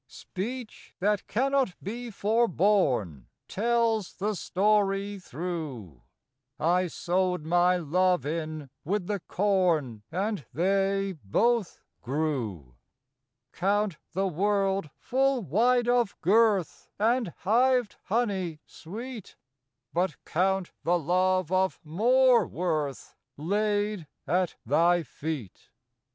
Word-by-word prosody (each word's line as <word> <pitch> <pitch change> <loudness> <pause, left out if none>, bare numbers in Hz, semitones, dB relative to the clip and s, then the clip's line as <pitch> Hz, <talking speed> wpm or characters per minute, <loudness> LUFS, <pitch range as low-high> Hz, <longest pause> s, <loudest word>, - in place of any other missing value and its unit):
Speech 230 +5 -7
that 205 +1 0
cannot 265 -3 +1
be 235 +5 -6
forborne 195 - +1 0.2
Tells 230 -1 +1
the 210 +3 -1
story 200 +1 +1
through: 145 - -6 0.6
I 180 +3 +2
sowed 180 -1 -1
my 175 +2 +3
love 180 -1 +1
in 155 -2 -4
with 195 +3 -1
the 205 +1 -2
corn, 175 - +1
And 195 0 -2
they 195 +3 +1
both 225 - +1 0.2
grew. 120 - -3 0.8
Count 200 -2 0
the 190 +3 0
world 195 -1 0
full 265 -1 +1
wide 240 - +2
of 240 -4 +1
girth, 205 -1 +2
And 230 +2 +2
hived 245 +3 +2
honey 195 -7 -1
sweet, 225 +5 -9 0.6
But 175 -1 0
count 190 +1 0
the 175 +1 +2
love 185 +2 +1
of 190 0 +1
more 240 +10 +4
worth 155 -6 -3 0.2
Laid 205 +2 -1 0.2
at 180 0 0
thy 170 +7 +3
feet. 140 - -6
190 Hz, 100 wpm, -28 LUFS, 165-210 Hz, 0.8 s, more